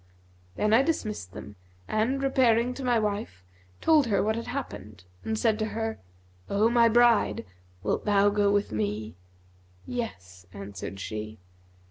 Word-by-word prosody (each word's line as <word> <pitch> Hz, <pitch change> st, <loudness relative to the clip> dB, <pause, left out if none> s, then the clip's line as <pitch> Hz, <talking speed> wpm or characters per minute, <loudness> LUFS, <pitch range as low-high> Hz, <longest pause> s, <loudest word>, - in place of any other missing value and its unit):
Then 210 Hz, +1 st, +1 dB
I 235 Hz, -, +7 dB
dismissed 215 Hz, -, -2 dB
them 105 Hz, 0 st, -10 dB, 0.3 s
and, 250 Hz, +6 st, 0 dB
repairing 250 Hz, -3 st, +3 dB
to 270 Hz, -, -7 dB
my 245 Hz, -2 st, +2 dB
wife, 205 Hz, -, -3 dB, 0.4 s
told 310 Hz, -5 st, +4 dB
her 200 Hz, -3 st, +2 dB
what 220 Hz, +1 st, +1 dB
had 230 Hz, -, -5 dB
happened 105 Hz, -, -6 dB, 0.2 s
and 220 Hz, -, -2 dB
said 220 Hz, -1 st, +1 dB
to 215 Hz, -, 0 dB
her, 225 Hz, 0 st, -2 dB, 0.5 s
'O 215 Hz, +3 st, +3 dB
my 235 Hz, -1 st, +5 dB
bride, 230 Hz, -, +3 dB, 0.4 s
wilt -, -, -1 dB
thou 205 Hz, -1 st, +4 dB
go 205 Hz, -1 st, +2 dB
with 205 Hz, -, +1 dB
me?' 105 Hz, 0 st, -2 dB, 0.7 s
'Yes,' 90 Hz, -, -6 dB
answered 100 Hz, 0 st, -7 dB
she. 110 Hz, +2 st, -5 dB
215 Hz, 145 wpm, -27 LUFS, -, 0.7 s, I